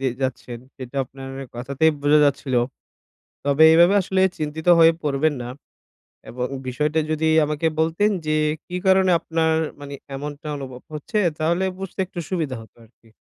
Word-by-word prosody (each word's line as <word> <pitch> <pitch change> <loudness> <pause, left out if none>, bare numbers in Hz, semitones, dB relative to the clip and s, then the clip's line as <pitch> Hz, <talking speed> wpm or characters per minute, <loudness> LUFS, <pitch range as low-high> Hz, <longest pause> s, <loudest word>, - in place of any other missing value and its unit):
দিয়ে 130 -2 0
যাচ্ছেন 125 -2 -4 0.2
সেটা 130 0 -9
আপনার 135 +1 -10 0.2
কথাতেই 140 +6 +1
বোঝা 145 +1 +4
যাচ্ছিল। 140 -2 0 0.9
তবে 140 +2 +4
এভাবে 170 +4 +6
আসলে 190 0 0 0.2
চিন্তিত 155 +2 -5
হয়ে 165 0 +7
পড়বেন 150 +1 +1
না। 120 - -6 0.8
এবং 125 +1 -3 0.2
বিষয়টা 150 +5 0
যদি 155 +1 0 0.2
আমাকে 150 +2 -1
বলতেন 165 +6 +2 0.2
যে, 155 0 +1 0.3
কি 180 - -6
কারণে 190 0 +4
আপনার 160 -1 0 0.3
মানি 140 0 -7 0.2
এমনটা 145 +3 -7
অনুভব 130 -2 -8
হচ্ছে 150 +9 -4 0.2
তাহলে 170 +4 +1
বুঝতে 195 0 -8
একটু 180 -1 -8
সুবিধা 160 -8 -2
হতো 110 -2 -17
আরকি? 115 0 -27
150 Hz, 150 wpm, -22 LUFS, 135-165 Hz, 0.9 s, হয়ে